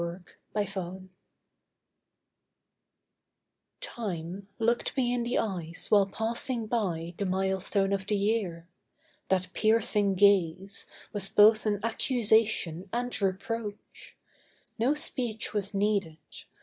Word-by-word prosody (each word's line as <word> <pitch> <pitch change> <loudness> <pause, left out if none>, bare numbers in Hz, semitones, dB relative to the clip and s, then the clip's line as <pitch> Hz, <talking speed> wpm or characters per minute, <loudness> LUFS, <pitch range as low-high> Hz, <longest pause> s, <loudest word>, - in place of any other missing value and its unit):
TIME'S 205 -2 -1
GAZE 185 -1 -5 2.8
Time 195 - -5
looked 235 +4 0
me 245 -2 +2
in 245 - 0
the 235 +1 -1
eyes 175 -6 -3
while 200 -2 +5
passing 230 +3 -2
by 180 -7 -2
The 200 - 0
milestone 190 +1 +1
of 195 -1 -2
the 210 - +1
year. 200 -5 -1 0.6
That 185 -1 0
piercing 210 -3 +3
gaze 195 -1 +2 0.3
Was 195 -2 +1
both 215 +1 +5
an 205 -1 0
accusation 220 -7 +2
and 245 -1 -3
reproach. 205 +2 -4 0.6
No 255 +6 +2
speech 245 -9 -2
was 200 -1 -2
needed. 195 -5 0
205 Hz, 105 wpm, -29 LUFS, 190-225 Hz, 2.8 s, while